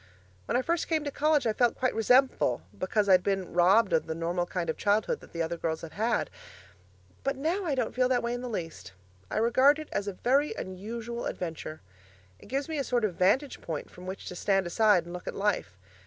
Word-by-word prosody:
When - - +1
I 255 - 0
first 340 +2 0
came 315 -2 0
to 285 - -3
college 300 -1 +2
I 220 - +2
felt 240 +1 +2
quite 255 -1 +1
resentful 235 - +3
because 200 - 0
I'd 185 -2 +6
been 195 -1 -2
robbed 190 +3 +4
of 160 - +2
the 160 - -3
normal 175 +2 -1
kind 175 -2 -3
of 160 - -1
childhood 215 - +1
that - - -16
the 165 -1 -2
other 165 +1 -3
girls 160 -1 -2
had 165 - -8
had; 230 +3 0 0.9
but 275 0 0
now, 340 +8 -1
I 295 -5 0
don't 250 -4 -1
feel 255 0 +2
that 245 -2 +2
way 235 0 -1
in 245 - -4
the 250 - -5
least. 165 - -6 0.4
I - - -3
regard 255 +6 +5
it 310 -1 -8
as 205 - -2
a 200 - -2
very 270 +9 +1
unusual 225 +5 -5
adventure. 160 -2 -5 0.6
It - - -15
gives 275 +2 -2
me 315 -2 -3
a - - 0
sort 240 -3 +1
of 200 - -1
vantage 205 - +1
point 160 -3 -5
from 180 +1 -11
which 190 +1 -6
to 180 - -6
stand 195 +1 +1
aside 205 0 +3
and 175 - -9
look 180 - -8
at - - -4
life. 195 - -1
215 Hz, 230 wpm, -29 LUFS, 180-255 Hz, 0.9 s, I'd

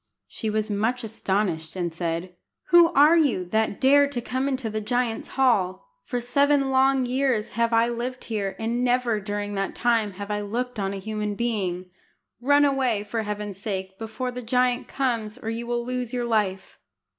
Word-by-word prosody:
She 220 - -4
was 215 0 -1
much 225 +5 0
astonished, 190 -7 -2
and 175 -3 -2
said 170 +1 -3 0.4
"Who 345 -1 +7
are 300 +4 +6
you, 275 - +2
that 220 -1 0
dare 285 +2 +5
to 280 -3 -3
come 260 +3 -2
into 260 -4 -2
the 215 0 -3
giant's 240 +1 -1
hall? 220 - +2 0.2
For 245 - -2
seven 280 +2 +2
long 265 0 +3
years 250 -3 0
have 230 0 0
I 230 0 +4
lived 240 +2 -4
here, 200 -4 -3
and 235 +2 -1
never 245 -3 +1
during 205 0 -4
that 195 -1 -2
time 230 -4 +1
have 200 +2 -6
I 210 0 -1
looked 240 +3 -3
on 195 0 -1
a - - -4
human 210 +1 -3
being. 185 -6 -2 0.5
Run 285 +3 +5
away, 260 -7 +1
for 220 +2 -3
Heaven's 210 -2 -5
sake, 190 -2 -4
before 225 +3 -4
the 250 0 -6
giant 250 +1 +1
comes, 230 -5 -2
or 225 -3 -4
you 235 +1 -4
will 240 0 -1
lose 250 -1 -3
your 245 -1 -1
life." 210 -5 -1
230 Hz, 180 wpm, -25 LUFS, 205-250 Hz, 0.5 s, Who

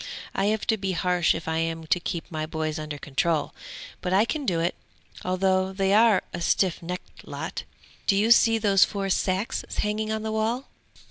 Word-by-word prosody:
I 195 - 0
have 215 +1 0
to 220 - +2
be 190 -2 -2
harsh 180 -1 +2
if 160 - -6
I 160 0 0
am 165 0 -2
to 170 +3 +2
keep 170 -1 -5
my 155 -1 -3
boys 155 -1 -3
under 155 -1 -5
control! 150 +3 -1 0.5
But 180 - -1
I 200 +4 +5
can 280 +4 -3
do 175 -4 +1
it, 170 +2 0 0.5
although 185 +1 +1
they 195 0 +1
are 220 -2 +5
a 175 - -4
stiff 180 0 +1
necked 180 +2 -8
lot! - - -5 0.4
Do 200 - +4
you 215 +3 +3
see 225 -1 +6
those 200 -3 +4
four 195 -2 -1
sacks 190 +4 0
hanging 215 +1 -1
on 220 0 -2
the 220 - -2
wall? 225 +4 -1
190 Hz, 195 wpm, -26 LUFS, 165-215 Hz, 0.5 s, see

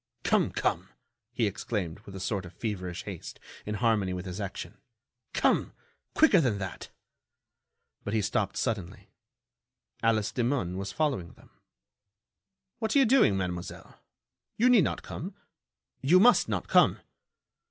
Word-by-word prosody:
"Come! - - +2
Come!" - - -1 0.4
he 120 -2 0
exclaimed, 100 -4 -3
with 100 - -9
a - - -6
sort 95 0 -2
of 90 - -14
feverish 95 -6 -4
haste, - - -8 0.3
in 105 - -2
harmony 105 -4 +1
with 90 +1 -5
his 90 +2 -5
action. 100 -1 -6 0.5
"Come! - - +1 0.4
quicker 215 - +6
than 120 -8 +1
that." 95 -2 -6 1.1
But 105 - -3
he 110 - +2
stopped 100 0 -1
suddenly. 110 -8 -3 0.9
Alice 110 -2 +2
Demun 120 -8 0
was 100 +1 -4
following 135 - -1
them. - - -21 1.3
"What 220 +1 -1
are - - +6
you 270 - +6
doing, 225 - +4
Mademoiselle? 90 -2 -5 0.6
You 245 +3 +4
need 215 -10 +6
not - - -3
come. 185 +6 -7 0.7
You 165 +8 +5
must 240 +5 +5
not - - -2
come!" - - +4
105 Hz, 140 wpm, -29 LUFS, 95-140 Hz, 1.3 s, quicker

